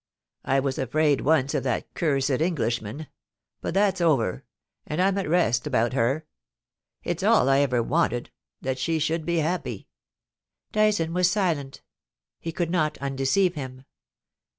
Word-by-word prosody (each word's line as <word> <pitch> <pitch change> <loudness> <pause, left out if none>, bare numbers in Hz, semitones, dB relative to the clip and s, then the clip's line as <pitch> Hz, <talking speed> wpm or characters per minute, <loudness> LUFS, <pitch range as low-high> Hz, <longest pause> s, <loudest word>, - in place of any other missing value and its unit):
I 135 +1 +2
was 135 -1 -2
afraid 145 +2 +2
once 145 -3 +2
of - - 0
that 125 -3 -2
cursed 140 -4 0
Englishman; 130 - -1 0.6
but - - -4
that's 195 -2 +2
over, 135 - +1 0.4
and 150 - -3
I'm 190 +1 +3
at 190 - -3
rest 150 -7 +2
about 125 -3 +1
her. 135 +5 0 0.8
It's 175 +1 -2
all 210 - +4
I've 135 +1 +4
ever 120 -2 +2
wanted 130 -4 0 0.2
— - - -62
that 130 0 -2
she 160 +5 0
should 160 +1 -1
be 170 0 +1
happy,' 165 +3 -2 0.8
Dyson 210 -7 +2
was 180 0 +3
silent; 165 -9 -1 0.6
he 165 - -4
could 170 0 -2
not 155 -4 0
undeceive 140 +7 +1
him. 130 -3 -7
150 Hz, 150 wpm, -25 LUFS, 130-170 Hz, 0.8 s, all